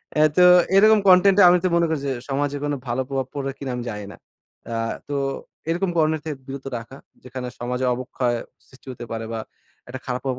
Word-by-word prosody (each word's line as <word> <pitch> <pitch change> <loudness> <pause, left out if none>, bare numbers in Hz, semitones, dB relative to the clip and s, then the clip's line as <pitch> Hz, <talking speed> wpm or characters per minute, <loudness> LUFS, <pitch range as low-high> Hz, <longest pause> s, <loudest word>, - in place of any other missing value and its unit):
অ্যা 155 - +5
তো 180 - +7 0.3
এরকম 215 +2 +6
কনটেন্ট 190 +2 +6
এ - - +8
আমি 180 - +5
তো - - +3
মনে 170 0 +3
করি 160 -3 -1
যে 135 - 0 0.2
সমাজে 145 +1 -1
কোন 145 0 -1
ভালো 120 +2 -1
প্রভাব 135 -2 -2
পড়বে 135 -1 -3
কিনা 135 -2 -5
আমি 125 - -4
জানি 105 -1 -6
না। - - -14 0.6
আ - - -2 0.3
তো 145 - -2 0.5
এরকম 175 +3 0
কনটেন্ট 155 -1 +2
থেকে 150 -3 -4
বিরত 135 0 -7
রাখা 115 +4 -10 0.3
যেখানে 125 0 -6
সমাজের 125 +1 -2
অবক্ষয় 125 -1 -2 0.3
সৃষ্টি 130 0 -20
হতে 120 - -9
পারে 115 0 -4
বা 115 - -3 0.5
একটা 130 +1 -6
খারাপ 125 0 -3
প্রভাব 130 -2 -2
135 Hz, 210 wpm, -23 LUFS, 125-160 Hz, 0.6 s, এ